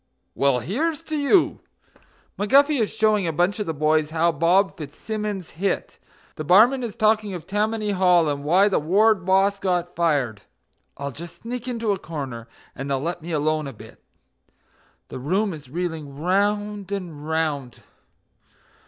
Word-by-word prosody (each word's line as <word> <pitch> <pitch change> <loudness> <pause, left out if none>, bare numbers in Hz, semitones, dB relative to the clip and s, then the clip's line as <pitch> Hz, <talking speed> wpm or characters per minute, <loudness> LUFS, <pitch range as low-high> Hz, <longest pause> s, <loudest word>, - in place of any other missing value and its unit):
Well, 140 -2 +2
here's 300 - -2
to 315 -1 -4
you!" 300 +5 +3 0.8
McGuffy 275 +6 +4
is 215 - 0
showing 215 -4 +2
a - - 0
bunch 175 +6 0
of 210 - -3
the 160 - -1
boys 155 +1 +2
how 165 +1 +2
Bob 175 +5 +2
Fitzsimmons 200 +5 -5
hit; 190 +4 -3 0.4
The 155 - -4
barman 220 - +5
is 235 -4 -5
talking 215 -2 +1
of 170 - -8
Tammany 210 +1 -1
Hall, 180 -4 +4
and 140 -1 -2
why 180 +7 +4
the 200 - +2
ward 190 +4 +2
boss 195 +1 +3
got 180 -2 -1
fired. 140 -11 0 0.6
I'll 140 0 -4
just 170 +6 -11
sneak 245 +1 -5
into 230 -3 -1
a 195 - -1
corner 135 -9 -6 0.3
and 135 +2 -6
they'll 135 -1 0
let 170 +4 -3
me 170 +2 -7
alone 155 -1 0
a 135 - -7
bit; 110 - -14 1.1
The - - -7
room 190 +9 0
is 145 -5 -11
reeling 160 -3 -4
round 205 +3 0
and 165 -6 -5
round... 150 -6 -2
180 Hz, 160 wpm, -23 LUFS, 155-210 Hz, 1.1 s, barman